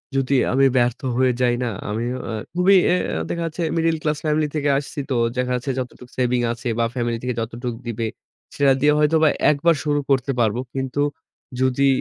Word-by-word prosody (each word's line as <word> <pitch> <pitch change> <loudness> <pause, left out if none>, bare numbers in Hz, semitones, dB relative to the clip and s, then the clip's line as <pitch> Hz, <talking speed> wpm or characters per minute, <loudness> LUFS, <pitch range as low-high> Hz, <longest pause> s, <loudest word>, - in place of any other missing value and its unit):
যদি 135 +1 +1 0.2
আমি 135 +1 +4
ব্যর্থ 120 0 +2 0.2
হয়ে 130 0 +3
যাই 120 -1 +3
না 120 - -1 0.2
আমি 110 +3 -2 0.3
আ - - -3 0.2
খুবই 185 +2 +5
অ্যা 180 - 0
দেখা 170 -1 -2
যাচ্ছে 165 +1 -3
মিডল 165 0 +2
ক্লাস 150 -1 0
ফ্যামিলি 155 0 +1
থেকে 145 -1 +1
আসছি 145 +2 -5
তো 130 - +1 0.2
দেখা 125 0 0
যাচ্ছে 125 +2 -2
যতটুকু 125 0 -7
সেভিং 125 -1 +1
আছে 120 +1 -5
বা 115 - +3
ফ্যামিলি 120 -2 -1
থেকে 125 0 -1
যতটুকু 115 +1 -5
দিবে 115 -1 -2 0.5
সেটা 140 -1 +4
দিয়ে 150 0 +5
হয়তোবা 155 +1 +4 0.2
একবার 160 +3 +2
শুরু 145 -1 +1
করতে 135 +1 +2
পারব। 110 -2 +2 0.2
কিন্তু 135 +1 -2 0.6
যদি 130 +1 +2
135 Hz, 185 wpm, -22 LUFS, 125-150 Hz, 0.6 s, খুবই